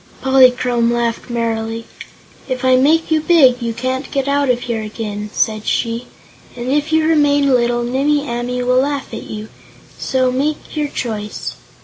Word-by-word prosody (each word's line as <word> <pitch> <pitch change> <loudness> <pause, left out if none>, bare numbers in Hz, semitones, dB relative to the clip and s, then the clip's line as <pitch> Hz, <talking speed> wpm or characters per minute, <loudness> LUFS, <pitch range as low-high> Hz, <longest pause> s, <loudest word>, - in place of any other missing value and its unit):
Polychrome 250 -3 +4
laughed 235 0 -2
merrily. 230 -1 -2 0.6
"If 255 0 -2
I 255 0 +5
make 315 +6 +3
you 315 -1 +3
big, 275 -7 +4
you 235 -1 -1
can't 255 +4 -3
get 275 -1 -1
out 280 -1 +1
of 245 -1 +1
here 235 -3 -3
again," 210 -1 -5
said 215 -1 -1
she, 230 +1 -1 0.5
"and 245 +1 -4
if 295 +2 0
you 315 0 +3
remain 290 -3 +3
little 240 -1 +2
Nimmie 285 +4 0
Amee 245 +1 -2
will 250 +1 +3
laugh 280 -1 -3
at - - -7
you. 215 0 -7 0.5
So 255 -1 +1
make 290 +6 -2
your 300 -1 0
choice." 215 -6 -4
250 Hz, 160 wpm, -17 LUFS, 235-280 Hz, 0.6 s, I